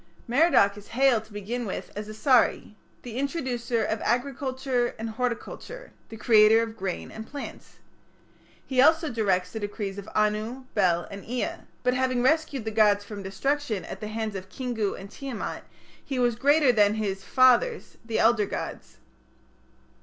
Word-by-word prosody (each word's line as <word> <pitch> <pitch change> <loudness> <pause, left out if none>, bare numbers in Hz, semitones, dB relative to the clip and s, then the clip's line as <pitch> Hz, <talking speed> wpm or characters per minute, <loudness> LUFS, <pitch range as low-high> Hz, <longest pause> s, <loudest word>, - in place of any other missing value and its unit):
Merodach 240 -7 +4
is 205 - -12
hailed 260 -5 +4
to 220 - -21
begin 215 +4 -4
with 190 - -5
as 210 +1 -5
Asari, 230 0 +2 0.3
the 240 -1 -7
introducer 255 -5 -1
of 220 - -2
agriculture 260 -1 -1
and 225 0 -4
horticulture, 250 - -5 0.2
the 225 - -9
creator 220 0 +5
of 225 -1 -6
grain 190 -4 -4
and 220 0 -8
plants. 285 0 -9 0.9
He 260 -1 +2
also 320 +2 +4
directs 190 -5 0
the 220 - -5
decrees 205 -1 -4
of 200 - -9
Anu, 215 +4 0
Bel, 175 -4 +2
and 200 0 -8
Ea; 245 +1 -4 0.2
but 250 0 +2
having 255 -1 +1
rescued 285 -4 +1
the 220 - -2
gods 210 -2 +4
from 205 -1 -7
destruction 225 +3 -2
at - - -7
the 215 - -4
hands 220 0 -3
of 190 0 -7
Kingu 230 -3 -2
and 195 +1 -10
Tiamat, 270 -6 -6 0.4
he 270 - -4
was 240 -2 +2
greater 285 +2 +4
than 210 -2 +3
his 195 -3 -3
"fathers", 255 - +3
the 230 -1 -2
elder 225 -3 +3
gods. - - -6
225 Hz, 160 wpm, -26 LUFS, 210-255 Hz, 0.9 s, creator